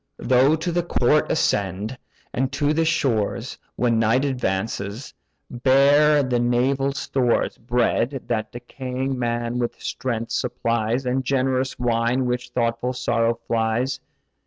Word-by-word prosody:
Thou 130 Hz, +4 st, +3 dB
to 165 Hz, +2 st, -3 dB
the 175 Hz, +1 st, +1 dB
court 150 Hz, -3 st, +2 dB
ascend: 100 Hz, -, 0 dB, 0.4 s
and 135 Hz, 0 st, -1 dB
to 145 Hz, +2 st, +1 dB
the 165 Hz, +1 st, +1 dB
shores 115 Hz, -10 st, -1 dB, 0.2 s
(When 115 Hz, -1 st, +1 dB
night 115 Hz, +5 st, +2 dB
advances) 110 Hz, -2 st, -3 dB, 0.4 s
bear 140 Hz, +4 st, +4 dB
the 125 Hz, -2 st, 0 dB
naval 130 Hz, +3 st, +1 dB
stores; 130 Hz, -3 st, 0 dB
Bread, 120 Hz, +2 st, 0 dB
that 110 Hz, -2 st, -2 dB
decaying 130 Hz, +2 st, -4 dB
man 120 Hz, 0 st, -1 dB
with 120 Hz, -1 st, -3 dB
strength 115 Hz, -2 st, -3 dB
supplies, 120 Hz, 0 st, -1 dB
And 130 Hz, +1 st, 0 dB
generous 130 Hz, 0 st, 0 dB
wine, 120 Hz, +1 st, +1 dB
which 125 Hz, 0 st, -2 dB
thoughtful 120 Hz, +1 st, -1 dB
sorrow 115 Hz, -2 st, +1 dB
flies. 115 Hz, +3 st, 0 dB
125 Hz, 125 wpm, -23 LUFS, 115-135 Hz, 0.4 s, bear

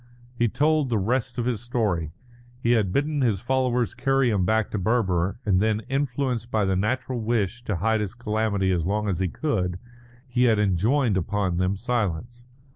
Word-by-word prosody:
He 120 Hz, -1 st, +1 dB
told 150 Hz, +3 st, +1 dB
the 115 Hz, -, +1 dB
rest 120 Hz, +5 st, -1 dB
of 120 Hz, -, -1 dB
his 120 Hz, -4 st, -1 dB
story. 105 Hz, -10 st, -1 dB, 0.5 s
He 120 Hz, -1 st, +1 dB
had 110 Hz, -6 st, +2 dB
bidden 145 Hz, +5 st, 0 dB
his 110 Hz, -7 st, +2 dB
followers 125 Hz, 0 st, 0 dB
carry 135 Hz, -2 st, +2 dB
him 95 Hz, -4 st, +1 dB
back 110 Hz, +2 st, +1 dB
to 105 Hz, -, -2 dB
Berber, 95 Hz, -4 st, +1 dB
and 95 Hz, -3 st, +3 dB
then, 110 Hz, +1 st, +1 dB
influenced 130 Hz, -4 st, -1 dB
by 110 Hz, -3 st, +1 dB
the 95 Hz, 0 st, +1 dB
natural 125 Hz, +5 st, -1 dB
wish 110 Hz, 0 st, -1 dB
to 105 Hz, -, -1 dB
hide 110 Hz, +4 st, +1 dB
his 105 Hz, +2 st, -4 dB
calamity 110 Hz, -4 st, 0 dB
as 85 Hz, -2 st, 0 dB
long 105 Hz, +2 st, 0 dB
as 90 Hz, -4 st, -1 dB
he 95 Hz, -, +1 dB
could, 90 Hz, -, -1 dB, 0.5 s
he 125 Hz, 0 st, +2 dB
had 115 Hz, -3 st, +4 dB
enjoined 105 Hz, -, +2 dB
upon 95 Hz, 0 st, -1 dB
them 90 Hz, +2 st, +1 dB
silence. 120 Hz, +1 st, -3 dB
110 Hz, 185 wpm, -25 LUFS, 95-125 Hz, 0.5 s, had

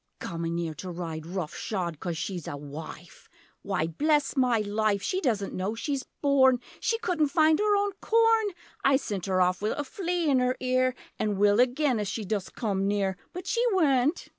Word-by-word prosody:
Comin' 165 Hz, 0 st, -3 dB
'ere 165 Hz, -2 st, -2 dB
to 180 Hz, +5 st, -7 dB
ride 165 Hz, -2 st, -5 dB
rough 175 Hz, -3 st, -4 dB
shod 175 Hz, -7 st, -3 dB
Coz 175 Hz, -3 st, -3 dB
she's 180 Hz, -1 st, -4 dB
a 145 Hz, -, -4 dB
'wife.' 150 Hz, +4 st, -10 dB, 0.3 s
Why 190 Hz, -5 st, -1 dB
bless 295 Hz, -, +1 dB
my 250 Hz, -3 st, +3 dB
life 210 Hz, -1 st, 0 dB
She 370 Hz, -, -1 dB
doesn't 215 Hz, -, 0 dB
know 195 Hz, +4 st, -2 dB
she's 275 Hz, +3 st, -2 dB, 0.2 s
born; 265 Hz, -3 st, +5 dB, 0.2 s
She 455 Hz, 0 st, 0 dB
couldn't 360 Hz, -9 st, +1 dB
find 315 Hz, +1 st, +3 dB
her 420 Hz, 0 st, +3 dB
own 405 Hz, 0 st, +1 dB
corn! 455 Hz, -1 st, +4 dB, 0.4 s
I 275 Hz, 0 st, +5 dB
sent 205 Hz, -8 st, -2 dB
'er 185 Hz, -1 st, +2 dB
off 180 Hz, +1 st, +2 dB
wi' 210 Hz, -, 0 dB
a 290 Hz, -, -1 dB
flea 350 Hz, +2 st, -2 dB
in 260 Hz, -2 st, +3 dB
'er 250 Hz, 0 st, +1 dB
ear! 255 Hz, 0 st, +1 dB, 0.2 s
An' 210 Hz, -2 st, 0 dB
will 205 Hz, +2 st, +4 dB
again 255 Hz, 0 st, +2 dB
if 210 Hz, -, -2 dB
she 215 Hz, +2 st, -3 dB
dost 200 Hz, -1 st, -3 dB
come 195 Hz, -4 st, -1 dB
near! 200 Hz, -2 st, 0 dB, 0.2 s
But 360 Hz, -, -7 dB
she 470 Hz, -, +1 dB
weant! 295 Hz, -3 st, +2 dB
220 Hz, 190 wpm, -27 LUFS, 185-290 Hz, 0.4 s, born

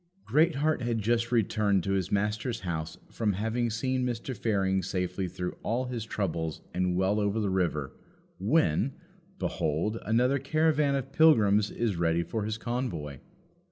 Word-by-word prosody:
Greatheart 155 Hz, -2 st, +2 dB
had 120 Hz, -1 st, 0 dB
just 115 Hz, +2 st, 0 dB
returned 105 Hz, -4 st, +2 dB
to 95 Hz, -, -1 dB
his 95 Hz, -3 st, 0 dB
Master's 105 Hz, +3 st, -1 dB
house 80 Hz, -3 st, -4 dB
from 110 Hz, -3 st, 0 dB
having 115 Hz, +4 st, -1 dB
seen 130 Hz, +3 st, -1 dB
Mr. 125 Hz, +1 st, -3 dB
Fearing 95 Hz, -4 st, +1 dB
safely 90 Hz, 0 st, -2 dB
through 90 Hz, +1 st, -4 dB
all 120 Hz, +3 st, -1 dB
his 120 Hz, -3 st, -4 dB
troubles 80 Hz, -7 st, -3 dB
and 90 Hz, 0 st, 0 dB
well 95 Hz, +3 st, +2 dB
over 100 Hz, +1 st, 0 dB
the 100 Hz, -3 st, 0 dB
river, 85 Hz, -7 st, -1 dB, 0.5 s
when, 110 Hz, -, +2 dB, 0.4 s
behold, 85 Hz, +9 st, -1 dB
another 125 Hz, +5 st, +2 dB
caravan 155 Hz, -2 st, +2 dB
of 135 Hz, 0 st, -3 dB
pilgrims 110 Hz, -10 st, +5 dB
is 110 Hz, -6 st, -1 dB
ready 85 Hz, 0 st, +1 dB
for 110 Hz, +3 st, -3 dB
his 110 Hz, 0 st, -2 dB
convoy. 110 Hz, -, -3 dB
105 Hz, 150 wpm, -29 LUFS, 95-120 Hz, 0.5 s, pilgrims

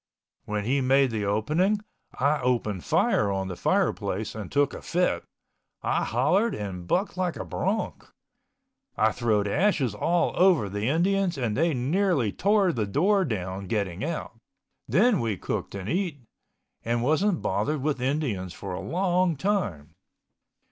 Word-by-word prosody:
When 105 Hz, -1 st, -2 dB
he 135 Hz, +4 st, +1 dB
made 135 Hz, 0 st, +3 dB
the 105 Hz, -2 st, -2 dB
opening 155 Hz, -, +1 dB, 0.4 s
I 145 Hz, +2 st, +2 dB
opened 115 Hz, -7 st, 0 dB
fire 105 Hz, -, +2 dB
on 95 Hz, -1 st, -2 dB
the 90 Hz, -, -4 dB
fireplace 105 Hz, +4 st, 0 dB
and 105 Hz, -4 st, -7 dB
took 145 Hz, 0 st, +2 dB
a -, -, -7 dB
fit. 180 Hz, +1 st, 0 dB, 0.6 s
I -, -, +1 dB
hollered 180 Hz, -, +2 dB
and 90 Hz, -4 st, -6 dB
bucked 190 Hz, -, 0 dB
like 180 Hz, -2 st, -1 dB
a -, -, -5 dB
bronc. 210 Hz, +4 st, -2 dB, 0.9 s
I 110 Hz, +1 st, +3 dB
throwed 105 Hz, -3 st, +1 dB
ashes 145 Hz, -, +1 dB
all 175 Hz, 0 st, +1 dB
over 175 Hz, -, +4 dB
the 105 Hz, +3 st, -2 dB
Indians 180 Hz, +2 st, +1 dB
and 120 Hz, -5 st, -1 dB
they 165 Hz, 0 st, +2 dB
nearly 145 Hz, -, +1 dB
tore 200 Hz, -, +2 dB
the 110 Hz, -6 st, -1 dB
door 190 Hz, -, +2 dB
down 95 Hz, -, -4 dB
getting 100 Hz, -2 st, -2 dB
out. 160 Hz, -6 st, -4 dB, 0.5 s
Then 210 Hz, -, +3 dB
we 115 Hz, -5 st, -1 dB
cooked -, -, -4 dB
and 95 Hz, -1 st, -5 dB
eat, 170 Hz, -, -2 dB, 0.6 s
and 120 Hz, +1 st, 0 dB
wasn't 165 Hz, +7 st, +1 dB
bothered 150 Hz, -2 st, -1 dB
with 145 Hz, -4 st, -1 dB
Indians 125 Hz, -, -1 dB
for 95 Hz, -2 st, -6 dB
a -, -, -4 dB
long 180 Hz, -1 st, +1 dB
time. 105 Hz, -, -2 dB
135 Hz, 150 wpm, -26 LUFS, -, 0.9 s, over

